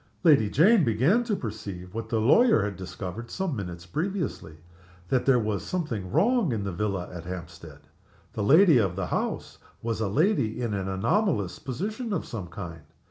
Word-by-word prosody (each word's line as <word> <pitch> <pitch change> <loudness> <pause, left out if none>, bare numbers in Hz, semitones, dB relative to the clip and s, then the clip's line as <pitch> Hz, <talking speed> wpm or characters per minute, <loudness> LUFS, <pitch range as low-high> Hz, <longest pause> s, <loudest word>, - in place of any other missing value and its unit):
Lady 145 - +5
Jane 185 - +5
began 135 - +3
to 220 -3 0
perceive, 100 - -7
what 115 0 -5
the 115 - +1
lawyer 140 - +5
had 100 -1 -3
discovered 95 +4 -7
some 190 -6 -2
minutes 90 -5 -6
previously 155 - -3 0.5
that 130 0 +1
there 135 -2 +6
was 110 -3 -1
something 120 - -3
wrong 235 - +3
in 110 -4 -2
the 100 - -3
villa 95 0 -2
at 85 -1 -8
Hampstead. 80 -4 -8 0.5
The - - -3
lady 155 - +6
of 95 -5 0
the 95 -1 -2
house - - -3 0.2
was 115 -1 -2
a 110 - +1
lady 135 - +1
in 120 -3 -2
an 95 -1 -2
anomalous 105 - 0
position 210 - -4
of 175 - -2
some 100 -6 -6
kind. 85 -2 -8
110 Hz, 175 wpm, -27 LUFS, -, 0.5 s, there